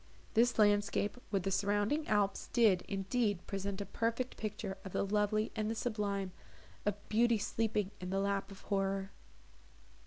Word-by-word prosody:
This 235 +2 +4
landscape 205 +1 +3
with 195 -3 0
the 195 - -1
surrounding 205 +10 +1
alps 205 -2 +1
did, 210 -6 +4
indeed, 200 0 0
present 195 0 -3
a - - -3
perfect 230 +4 -1
picture 205 -2 -4
of 190 - -8
the - - +1
lovely 210 +2 +1
and 215 -1 -1
the 225 - -1
sublime, 205 -5 -1 0.6
of 205 - +2
"beauty 230 +1 +4
sleeping 210 -1 0
in 180 - -5
the 195 +1 0
lap 200 0 0
of 195 0 -11
horror." 195 -1 -1
205 Hz, 155 wpm, -34 LUFS, 195-220 Hz, 0.6 s, This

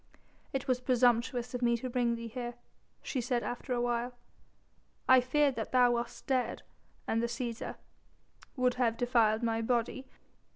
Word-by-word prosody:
"It 270 +1 -3
was 250 -1 +1
presumptuous 245 0 +2
of 250 - -3
me 235 -1 +3
to 255 - -5
bring 240 -1 +1
thee 230 0 -6
here," 240 +1 -5 0.5
she 260 - -2
said 245 0 -1
after 245 +2 -5
a 245 - +1
while. 240 0 -1 0.9
"I 260 -1 +7
feared 280 +2 +2
that 220 - -3
thou 250 -1 +5
wast 235 0 -3
dead, 255 -3 0 0.4
and 225 - +1
the 235 - 0
Cæsar...." 235 -1 -4 0.8
"Would 255 -2 +2
have 230 -2 +2
defiled 230 -2 +2
my 225 -1 +1
body. 245 +3 -1
245 Hz, 160 wpm, -31 LUFS, 235-255 Hz, 0.9 s, I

